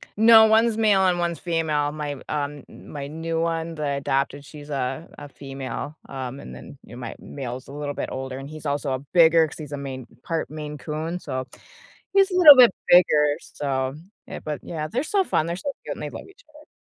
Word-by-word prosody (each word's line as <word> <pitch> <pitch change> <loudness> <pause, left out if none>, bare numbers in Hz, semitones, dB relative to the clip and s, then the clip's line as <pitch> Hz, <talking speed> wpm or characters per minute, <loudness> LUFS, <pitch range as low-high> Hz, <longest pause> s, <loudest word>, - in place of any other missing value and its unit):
No, 220 +1 +8
one's 220 +1 +3
male 210 -3 +4
and 175 -1 +1
one's 170 -1 -1
female. 155 -4 0
My, 150 -1 -4
uh, 150 -1 0
m 145 -1 -7 0.3
my 140 -2 -5
new 165 +2 -3
one, 165 0 -2
the 150 -1 -3
adopted 140 +1 -1
she's 150 -1 -12
a 135 +2 -3
a 145 - -9
female, 140 +2 -7
um, 135 0 -6
and - - -10
then, - - -12
you 120 - -12
know, - - -9
my 120 -2 -6
male's 130 -2 -7
a - - -11
little 145 0 -4
bit - - -4
older, 130 0 -5
and 135 +2 -8
he's 155 0 -10
also 145 -1 -1
a 130 - -2
bigger 165 -1 +6
because 150 - -9
he's 150 -2 -8
a 145 - -4
Maine 135 -2 -6 0.2
part 165 -1 -2
Maine 150 -1 -7
Coon, 160 +4 -4
so, 130 -5 -4 0.7
he's 390 -1 +4
a - - -1
little 310 -6 +11
bit 245 -5 +8 0.2
bigger, 150 -4 +5
so, 135 -1 -3 0.3
yeah, - - -7
but, 150 -1 -4
yeah, 155 -2 -4
they're 250 - -2
so 390 +4 +1
fun, 155 - 0
they're 170 - -2
so 280 +10 -4
cute, - - -4
and - - -8
they - - -4
love - - -9
each 400 +1 -20
other. 300 0 -18
150 Hz, 220 wpm, -24 LUFS, 140-170 Hz, 0.7 s, little